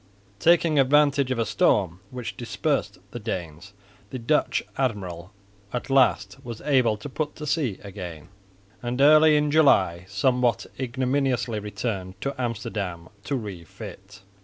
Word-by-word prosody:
Taking 165 -1 +4
advantage 140 0 +4
of 130 - -1
a 115 - +1
storm 95 -4 +2
which 125 -2 -6
dispersed - - -2
the 120 - -6
Danes, 90 -4 -6 0.4
the 130 - -5
Dutch 130 +6 +1
admiral 95 -9 -3 0.4
at 125 +2 -4
last 135 0 +3
was 120 -3 -7
able 125 -7 +2
to 105 - -8
put 150 +2 -3
to 150 - -7
sea 150 - 0
again, 90 -5 -8 0.5
and 125 +1 -3
early 155 +2 +7
in 150 0 +1
July 95 - +4
somewhat 120 +2 +1
ignominiously 130 -2 0
returned 100 -2 -4
to 140 - -2
Amsterdam 100 -7 -4 0.2
to 140 - -1
refit. 100 - -8
120 Hz, 135 wpm, -25 LUFS, 100-135 Hz, 0.5 s, early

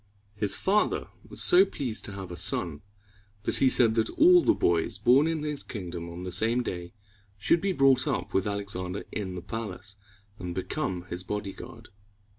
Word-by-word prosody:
His 105 -1 -2
father 205 +2 0 0.2
was - - +3
so 360 +1 +8
pleased 130 - -3
to 105 - -6
have 95 -2 -8
a - - -6
son, 85 -4 +1 0.6
that - - 0
he 135 - +4
said 115 -3 +4
that 110 -1 0
all 355 +3 +5
the 335 - +2
boys 85 +1 0
born 125 +8 +4
in 160 -2 -2
his 150 -2 -3
kingdom 85 -5 -7
on 85 +2 -8
the 90 - -5
same 115 +6 +3
day 90 -4 -6 0.4
should 160 +11 +2
be 195 - 0
brought 135 -5 +3
up - - -3
with 95 +1 0
Alexander 100 -2 -4
in 95 -3 -5
the 90 - -7
palace, 105 -1 -7 0.4
and 90 -1 -6
become 95 -3 -3
his 90 - -2
bodyguard. 105 0 -7
105 Hz, 180 wpm, -27 LUFS, 90-135 Hz, 0.6 s, so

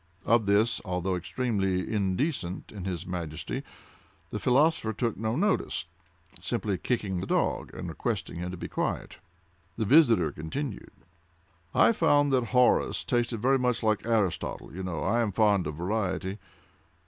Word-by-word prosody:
Of 115 -2 +3
this, 105 +3 +3
although 90 -1 -1
extremely 95 -1 -1
indecent 95 - -1
in 100 -4 -7
his 90 -2 -3
Majesty, 85 -4 -4 0.7
the - - -3
philosopher 135 -3 +2
took 115 +1 -1
no 110 +2 -2
notice:—simply 90 - -3
kicking 100 -5 -1
the 95 - -4
dog, - - 0
and - - -5
requesting - - -3
him 90 +1 -4
to 90 - -6
be - - -5
quiet. - - -3 0.6
The 110 - 0
visitor 120 - +5
continued: 125 - -5 0.9
"I - - +6
found 145 -8 +3
that 125 -2 +3
Horace 125 +1 +3
tasted 120 -2 -1
very 135 +1 +4
much 125 -2 0
like 110 -2 +1
Aristotle;—you 100 - -1
know 90 -4 -3
I 120 - +2
am 110 -3 0
fond 100 -4 +3
of 75 - -4
variety. 95 +2 -2
105 Hz, 140 wpm, -28 LUFS, 90-120 Hz, 0.9 s, I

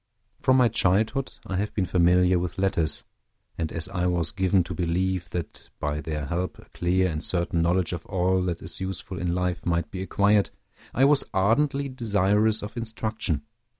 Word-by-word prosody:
From 130 0 +4
my 125 -2 +5
childhood, 110 +5 +1
I 95 - -3
have 105 +2 -2
been 95 - +1
familiar 90 0 +3
with 90 +1 -4
letters; 90 -6 0 0.5
and 80 -2 -3
as 80 +1 0
I 90 -2 -1
was 85 -2 0
given 95 -1 +2
to 85 - -6
believe 90 +1 -1
that 85 -2 -6
by 75 +1 -2
their 75 -1 -4
help 85 +4 -3
a - - -15
clear 90 +1 +1
and 80 -2 -3
certain 85 -2 +2
knowledge 85 +1 +1
of 85 -1 -6
all 95 -1 +1
that 85 -2 -3
is 80 - -5
useful 95 0 -4
in 90 -1 -1
life 90 -1 -1
might 85 -1 -1
be 95 - -5
acquired, 100 +1 +2 0.4
I 135 - +3
was 145 0 +5
ardently 140 +8 +2
desirous 110 -3 +1
of 105 +1 -7
instruction. 110 -7 -2
95 Hz, 180 wpm, -26 LUFS, 85-105 Hz, 0.5 s, my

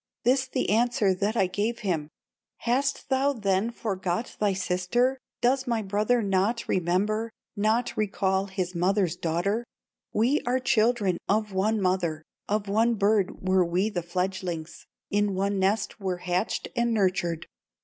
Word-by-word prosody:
"This 260 +2 +3
the 255 -3 -1
answer 230 -2 +3
that 205 +5 -1
I 195 - +4
gave 215 +6 -2
him: 165 -8 -1 0.5
'Hast 260 +3 0
thou 270 +1 +2
then 200 -2 0
forgot 195 -2 -3
thy 210 -1 +2
sister, 190 +8 0 0.2
Does 260 +2 +2
my 230 -2 0
brother 210 +4 +1
not 200 +4 +1
remember, 200 +6 0 0.3
Not 220 +3 +1
recall 195 -2 0
his 185 -2 -3
mother's 180 0 +1
daughter? 180 +7 -1 0.5
We 245 +8 +2
are 245 +1 +1
children 225 -7 +2
of 210 0 +1
one 210 +3 +1
mother, 180 -5 0 0.3
Of 210 0 0
one 225 +4 +2
bird 200 -2 +1
were 185 0 +4
we 180 +5 0
the 175 - -2
fledgelings, 180 -1 -4 0.2
In 205 -1 +1
one 200 +1 0
nest 200 +3 0
were 190 -3 -2
hatched 180 +3 -2
and 235 -1 +1
nurtured. 180 -5 0
200 Hz, 145 wpm, -27 LUFS, 185-230 Hz, 0.5 s, I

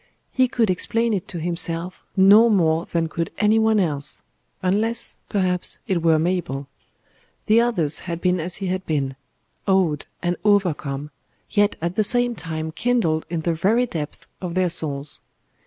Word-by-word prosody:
He 260 0 +3
could 230 -5 +1
explain 230 +5 0
it 190 -4 -2
to 175 - -5
himself 170 +1 -2
no 205 +5 +7
more 165 -5 +2
than 165 -1 0
could 165 0 -3
any 215 +1 +3
one 220 -1 +3
else 150 -6 -2 0.4
unless, 215 +5 0
perhaps, 185 -3 0
it 180 -3 0
were 165 -1 +4
Mabel. 155 -5 -1 0.8
The 225 +2 +5
others 180 -11 +2
had 170 -2 -5
been 180 0 +1
as 170 +2 -4
he 195 - -4
had 185 0 -2
been: 140 -4 -1 0.5
awed 185 -7 +2 0.2
and 175 0 0
overcome, 155 -8 +1 0.4
yet 205 -1 +3
at 170 +1 -2
the 215 - +4
same 245 +3 +1
time 160 -4 -4
kindled 175 -6 0
in 170 -1 -2
the 170 +1 0
very 215 +10 +2
depths 155 -10 -6 0.2
of 180 -2 -4
their 185 -1 +2
souls. 145 -4 -2
180 Hz, 160 wpm, -22 LUFS, 160-210 Hz, 0.8 s, no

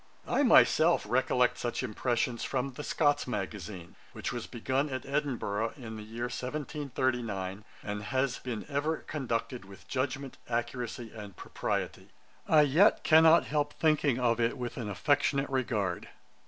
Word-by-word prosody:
I - - +2
myself - - +5
recollect - - +2
such - - -2
impressions 120 +1 -1
from 135 0 -2
'The 150 - -7
Scots 145 -3 +1
Magazine,' 95 -4 -5 0.2
which - - -4
was 120 -2 -5
begun 130 +4 -1
at 130 -2 -4
Edinburgh 125 -7 -1
in 115 -4 -7
the 110 - -7
year 115 +3 -6
1739, 125 -7 -3 0.2
and 105 0 -4
has 130 0 0
been 120 -4 -5
ever 150 +2 -1
conducted 125 -6 -3
with 95 0 -14
judgement, 135 0 -3
accuracy, 120 -1 -3
and 105 -4 -9
propriety. - - -3 0.4
I 155 -1 +6
yet 155 +9 +4
cannot 160 +1 +6
help 145 0 -1
thinking 150 -5 +2
of 120 -2 +2
it 115 +3 +1
with 125 -1 -4
an 115 -5 -4
affectionate 135 +6 +1
regard. 105 -9 -1
125 Hz, 140 wpm, -30 LUFS, 110-140 Hz, 0.4 s, I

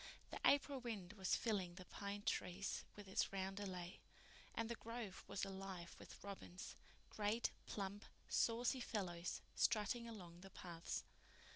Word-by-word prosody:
The - - -2
April 280 -1 +6
wind 210 -6 -3
was 190 -4 +3
filling 190 -6 +2
the 185 -1 -7
pine 200 +2 -3
trees 190 +1 +1
with 205 -1 -7
its 190 - +3
roundelay, 190 -2 -2 0.6
and 230 - +2
the 235 - 0
grove 230 -4 -4
was 200 - +1
alive 190 -2 -4
with - - -9
robins—great, 205 +3 -1 0.2
plump, 200 0 -2 0.2
saucy 240 +3 +4
fellows, 180 -7 0
strutting 235 +1 +4
along 175 -6 -7
the 195 - -8
paths. 170 -3 -3
200 Hz, 130 wpm, -45 LUFS, 185-225 Hz, 0.6 s, April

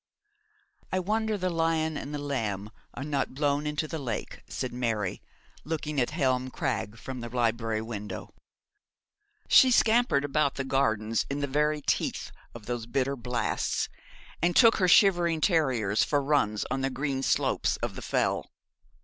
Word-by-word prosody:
'I 185 - +1
wonder 215 +2 0
the 185 -1 -1
lion 165 -1 0
and 145 0 -5
the 150 - -3
lamb 110 -8 -3 0.2
are 135 - -5
not 140 -3 -2
blown 145 +1 0
into 150 +1 -2
the 160 0 -4
lake,' 120 -6 -5
said 125 -1 -4
Mary, 115 -6 -2 0.4
looking 150 -1 -2
at 120 - +1
Helm 130 -5 0
Crag 110 -3 -3
from 130 +3 -7
the 120 - -6
library 115 -2 0
window. 105 -2 -6 1.1
She 260 - +7
scampered 230 - +3
about 145 0 +1
the 135 - -2
gardens 115 -5 0
in 140 +1 -2
the - - +1
very 150 +2 0
teeth - - -1 0.2
of 115 -3 -10
those 120 -1 -4
bitter 135 +2 0
blasts, 120 -2 -1 0.5
and 175 +1 +2
took 230 -2 +7
her 185 - +2
shivering 175 -3 +5
terriers 130 - +2
for 145 - +1
runs 135 -7 +1
on 135 0 -1
the 135 - 0
green 135 0 -2
slopes - - +1
of - - -1
the - - -7
Fell. - - 0
140 Hz, 160 wpm, -28 LUFS, 120-155 Hz, 1.1 s, She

